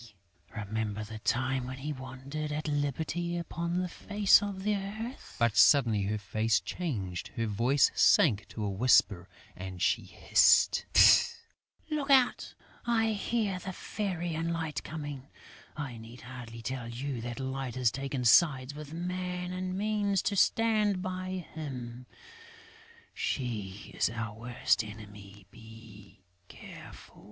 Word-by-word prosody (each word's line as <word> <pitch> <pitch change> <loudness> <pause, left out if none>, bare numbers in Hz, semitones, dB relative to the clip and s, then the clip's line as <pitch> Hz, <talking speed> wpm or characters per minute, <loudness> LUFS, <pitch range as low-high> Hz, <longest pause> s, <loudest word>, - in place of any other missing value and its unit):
Remember 110 0 -3
the 110 +1 -8
time 130 +2 0
when 130 +1 -6
we 150 +2 -4
wandered 135 +3 -6
at 150 +1 -3
liberty 155 +4 -2
upon 170 0 -3
the 180 0 0
face 205 +3 +3
of 200 -2 -4
the 210 0 +1
earth!..." 215 +6 -6
But, 115 -3 +2
suddenly 105 +3 +5
her 105 +2 -1
face 105 +3 +1
changed, 100 - -4
her 115 - -1
voice 120 +7 +3
sank 105 - +4
to 110 - -6
a 105 - -1
whisper 100 -4 +3 0.3
and 95 0 -7
she - - +2
hissed, - - +4 1.0
"Look 295 -2 -2
out! 260 -3 +3 0.3
I 225 -2 +2
hear 210 -2 -1
the 190 0 -6
Fairy 175 -4 -3
and 165 +1 -2
Light 160 -3 -3
coming. 145 -4 -7 0.5
I 135 -6 -5
need 115 +2 -12
hardly 120 -2 -9
tell 125 -1 -4
you 125 +1 -4
that 120 +2 -5
Light 130 -2 -4
has 125 -3 +2
taken 135 -2 -3
sides 130 +1 +5
with 150 0 -9
Man 180 +1 -3
and 185 0 -3
means 205 -2 0
to 205 - 0
stand 210 -2 +2
by 185 -1 -4
him; 125 -5 -7 1.1
she 105 -7 -4
is - - +2
our 115 -1 -4
worst 120 0 0
enemy.... 105 -2 -11
Be 105 -3 -15 0.2
careful!" - - -12
135 Hz, 135 wpm, -30 LUFS, 115-180 Hz, 1.1 s, suddenly